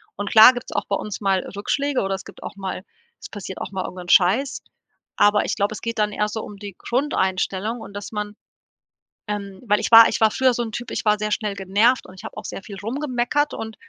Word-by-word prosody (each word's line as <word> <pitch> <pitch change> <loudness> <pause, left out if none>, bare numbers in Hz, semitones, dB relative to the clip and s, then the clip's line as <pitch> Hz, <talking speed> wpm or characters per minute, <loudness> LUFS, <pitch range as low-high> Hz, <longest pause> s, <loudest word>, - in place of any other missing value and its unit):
Und 205 0 -4
klar 220 +3 +9
gibt's 245 +1 -7
auch - - -1
bei 200 - 0
uns 210 +1 -5
mal 195 -1 +2 0.2
Rückschläge 280 +6 -1
oder 195 0 -1
es 190 - -8
gibt 200 - -13
auch - - -7
mal 190 -1 -5 0.4
es - - -10
passiert 195 -2 -7
auch - - -6
mal 190 -1 -3
irgendein 180 -1 -8
Scheiß, 220 +10 +3 0.6
aber 205 0 +4
ich - - -1
glaube, 200 +1 0
es - - -8
geht 230 0 -4
dann 210 0 +1
eher 210 +1 0
so 220 +1 -5
um 205 - -10
die 200 -2 -9
Grundeinstellung 220 -4 -1
und, 200 - -10
dass 205 +2 -7
man 210 -1 -4 0.9
ähm, 200 -2 -5
weil 210 0 +3
ich - - -3
war 230 0 +10
ich - - -2
war 220 -1 +5
früher 260 -1 +2
so 240 - -1
'n 225 - -6
Typ, 240 +3 -6
ich - - -4
war 210 0 +3
sehr 215 0 -2
schnell 210 -2 -1
genervt 205 +6 +2
und 185 - -13
ich - - -13
habe - - -8
auch - - -7
sehr 195 - -7
viel 200 -2 -9
rumgemeckert, 255 +5 -1
und 220 0 -6
210 Hz, 240 wpm, -22 LUFS, 195-230 Hz, 0.9 s, war